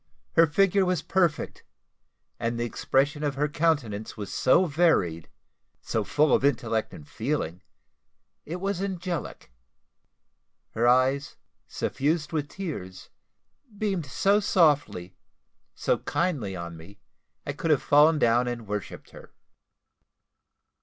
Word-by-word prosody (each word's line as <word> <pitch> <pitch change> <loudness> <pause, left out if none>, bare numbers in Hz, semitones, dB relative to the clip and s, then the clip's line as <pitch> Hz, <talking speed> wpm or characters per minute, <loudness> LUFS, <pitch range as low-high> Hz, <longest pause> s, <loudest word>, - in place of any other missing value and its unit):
Her 165 - +6
figure 195 +5 +3
was 180 -4 0
perfect, 175 -6 0 0.8
and 115 0 -2
the 120 - 0
expression 140 +5 0
of 145 -2 -1
her 145 +2 +1
countenance 145 -9 -1
was 100 -2 -6
so 170 +8 +4
varied 140 - +1 0.5
so - - -2
full 150 -1 +2
of - - +3
intellect 115 -5 0
and 75 - -12
feeling 85 +4 -3 0.8
it 165 - -6
was 195 0 -2
angelic. 180 - -4 1.2
Her 120 +2 +1
eyes, 130 +3 +2 0.3
suffused 150 +3 -2
with 150 -2 -2
tears, 95 - -7 0.7
beamed 195 -7 -2
so 200 +9 +2
softly, 145 - +1 0.6
so - - 0
kindly 140 - -2
on 85 -1 -6
me, 90 +5 -14 0.5
I 145 - -3
could 165 +3 -3
have 150 -4 +3
fallen 150 +2 +5
down 120 -2 +3
and 120 -2 -4
worshipped 105 -1 -6
her. - - -14
145 Hz, 120 wpm, -26 LUFS, 115-170 Hz, 1.2 s, Her